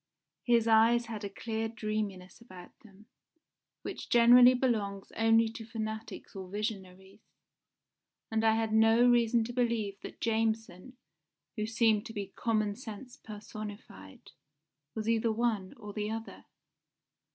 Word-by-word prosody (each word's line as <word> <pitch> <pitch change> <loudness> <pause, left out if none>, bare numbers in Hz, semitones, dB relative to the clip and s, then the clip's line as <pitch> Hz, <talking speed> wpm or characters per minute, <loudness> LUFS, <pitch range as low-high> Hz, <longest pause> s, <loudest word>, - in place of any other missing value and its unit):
His 235 -2 +3
eyes 230 +2 +4
had 220 -2 -7
a 200 - -4
clear 225 +2 -4
dreaminess 215 -4 -5
about 185 -6 -13
them, 210 -1 -19 0.8
which - - -7
generally 245 +1 +7
belongs 210 -6 -1
only 225 0 +4
to 225 0 -9
fanatics 220 -1 -6
or 190 -1 -7
visionaries, 195 -2 -6 1.1
and 220 0 0
I 220 0 +4
had 225 -1 -1
no 225 +2 +5
reason 235 -1 +3
to 240 +2 -6
believe 230 -5 -1
that - - -10
Jameson, 225 0 -2 0.6
who 215 0 -2
seemed 225 -1 +2
to 225 - -9
be 205 -2 -6
common 215 -3 0
sense 240 +1 -9
personified, 205 - -10 0.6
was 220 -1 -4
either 230 0 +2
one 220 -4 -1
or 210 -3 -9
the 210 0 -3
other. 225 +1 -7
220 Hz, 130 wpm, -30 LUFS, 205-230 Hz, 1.1 s, generally